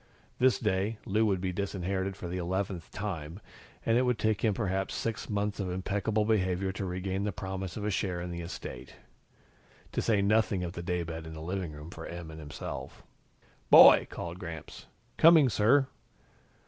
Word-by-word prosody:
This 130 0 +4
day, 105 0 0
Lou 110 +1 +2
would 95 -3 0
be 90 -1 -2
disinherited 95 0 -2
for 90 - -6
the 90 +2 -3
eleventh 90 -1 -3
time, 85 -4 -5 0.5
and 115 +1 +3
it - - +3
would 125 -2 +1
take 110 -2 0
him 110 -4 +2
perhaps 95 -3 -1
six 115 -1 -3
months 105 0 -1
of 95 -2 -2
impeccable 100 +4 0
behavior 95 -3 +1
to 95 +1 -4
regain 95 +2 -2
the 105 - -1
promise 95 -2 -5
of 105 - -4
a 105 - 0
share 95 -2 -1
in 90 0 -5
the 85 0 -5
estate. 85 +1 -8 1.0
To - - -1
say 110 -3 +2
nothing 105 -2 +2
of 85 - -3
the 85 - -5
daybed 85 -2 -3
in 80 - -8
the - - -7
living 90 +1 -3
room 75 +3 -9
for 80 -2 -8
Em 85 -2 -7
and 80 - -9
himself. 75 -2 -7 0.7
"Boy!" - - +9
called 85 +1 -6
Gramps. 85 -5 -8 0.3
"Coming, 160 -5 +7
sir." 120 +6 +4
95 Hz, 180 wpm, -30 LUFS, 90-105 Hz, 1.0 s, Boy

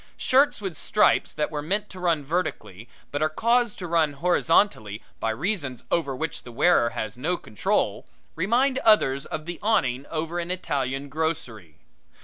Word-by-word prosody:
Shirts 270 -3 +3
with 190 -5 -4
stripes 210 - +2
that 150 - -2
were 150 -1 -3
meant 200 +7 -1
to 185 - -10
run 165 -5 0
vertically 115 - -3 0.2
but 145 - -2
are 155 - +2
caused 235 +6 +1
to 180 - -6
run 160 -3 +2
horizontally, 165 - +2 0.2
by 115 - -1
reasons 140 - -2
over 140 -6 0
which 160 +3 -4
the 120 - -11
wearer 120 -1 +3
has 110 -1 -5
no 175 +7 0
control, 105 -2 -1 0.3
remind 245 - +1
others 140 -11 +3
of 155 0 -5
the 175 0 -6
awning 135 - +1
over 165 +2 -3
an 170 0 -4
Italian 140 -6 -2
grocery. 130 - -4
160 Hz, 160 wpm, -25 LUFS, 135-185 Hz, 0.3 s, Shirts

